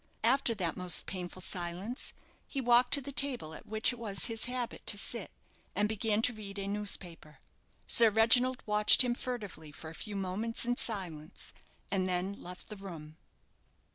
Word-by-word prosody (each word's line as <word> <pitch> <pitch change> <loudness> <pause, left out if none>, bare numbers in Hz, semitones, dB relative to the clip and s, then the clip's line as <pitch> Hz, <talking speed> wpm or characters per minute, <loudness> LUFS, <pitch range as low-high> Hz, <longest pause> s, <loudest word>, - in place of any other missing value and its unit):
After 245 0 +2
that 180 -5 -2
most 180 -1 0
painful 185 -1 -6
silence, 185 +7 -5 0.4
he 275 - -4
walked 245 -1 +4
to 285 - -1
the 280 - -7
table 255 - +2
at - - -11
which 220 +3 0
it 245 - -11
was 205 -4 +2
his 225 -2 +1
habit 250 -1 -5
to 205 - +2
sit, 215 +1 -1 0.5
and 205 +2 +1
began 220 0 -1
to 250 - +3
read 205 -2 -8
a 195 0 -4
newspaper. 195 -6 -2 0.5
Sir 230 -1 +7
Reginald 245 +4 +4
watched 210 +3 +6
him 245 -1 0
furtively 205 -12 -6
for 160 +2 -10
a - - -11
few 205 +5 -6
moments 200 +5 -2
in 245 0 0
silence, 170 -8 -3 0.4
and 185 -1 0
then 180 +2 -2
left 180 0 -10
the 210 - -8
room. 160 -5 -10
210 Hz, 170 wpm, -31 LUFS, 185-235 Hz, 0.5 s, Sir